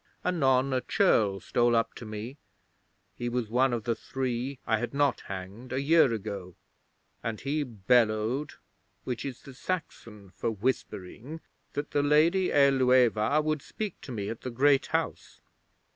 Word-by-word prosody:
Anon 135 -6 +2
a 130 - +1
churl 110 - +2
stole 120 +3 +2
up 115 - +1
to 115 - -9
me 110 +6 -6 0.8
he 120 - -4
was 120 -3 -2
one 130 +2 +3
of 120 -2 -2
the 120 0 +1
three 130 +2 -3
I 110 -2 +1
had 120 +4 -4
not 145 -1 +2
hanged 95 +6 -7
a 130 - 0
year 145 -1 +5
ago 100 -5 -5 0.7
and 115 -2 -3
he 145 +3 -1
bellowed 115 +2 +1 0.5
which 125 0 -4
is 135 -3 -6
the 135 - -11
Saxon 115 - -6
for - - -2
whispering 115 - -3 0.3
that 145 +1 -4
the 145 - +2
Lady 160 +6 +4
Ælueva 130 -1 +4
would 155 -1 -1
speak 210 +4 -6
to 130 - -9
me 105 -4 -3
at 115 - -6
the 130 - -4
Great 135 +3 +3
House. - - -3
125 Hz, 155 wpm, -28 LUFS, 110-140 Hz, 0.8 s, year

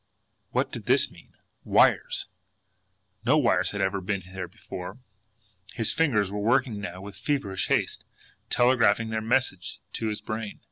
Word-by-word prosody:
WHAT - - 0
DID - - -7
THIS - - +4
MEAN? - - -18 0.3
Wires! - - +3 1.0
No 135 +6 +4
wires 105 -10 +3
had 100 - -3
ever 95 0 0
been 95 0 -2
there 95 -1 -4
before! 90 +5 -8 0.8
His 115 -3 +3
fingers 110 -12 +2
were 105 - -3
working 115 0 +1
now 90 -2 -6
with 100 0 -9
feverish 100 -5 -1
haste, - - 0 0.5
telegraphing 115 -3 +3
their 110 0 -1
message 110 -6 -1
to 115 - -2
his 105 -1 -2
brain. 110 -1 -5
105 Hz, 145 wpm, -27 LUFS, 95-120 Hz, 1.0 s, THIS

